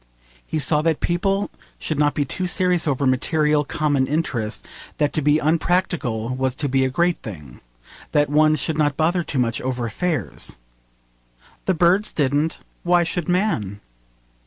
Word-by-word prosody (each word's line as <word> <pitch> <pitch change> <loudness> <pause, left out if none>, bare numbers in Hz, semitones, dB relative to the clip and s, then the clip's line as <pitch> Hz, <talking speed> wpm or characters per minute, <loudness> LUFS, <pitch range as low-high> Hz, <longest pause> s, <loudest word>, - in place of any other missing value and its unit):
He - - -2
saw 150 +1 +2
that 160 -1 +1
people 195 +3 0 0.3
should 155 -2 -3
not 145 -1 +2
be 145 - +1
too 185 +7 -2
serious 180 -2 +1
over 140 -1 0
material, 150 +3 +2
common 145 -2 0
interests: 125 -8 -2 0.3
that 150 -1 +1
to 155 - 0
be 150 +1 +4
unpractical 155 -7 0
was 130 0 -1
to 145 - -1
be 135 0 +2
a 130 - +1
great 170 +6 +1
thing: 75 - -10 0.5
that 145 0 +3
one 155 +1 +4
should 155 +2 -2
not 145 -2 +1
bother 170 +3 +2
too 155 - -4
much 115 -2 0
over 125 -2 -2
affairs. 120 - -3 1.1
The 190 - +2
birds 180 +5 +3
didn't, 145 +2 0 0.2
why 175 0 +3
should 175 -1 -3
man? 175 - 0
150 Hz, 160 wpm, -22 LUFS, 130-170 Hz, 1.1 s, be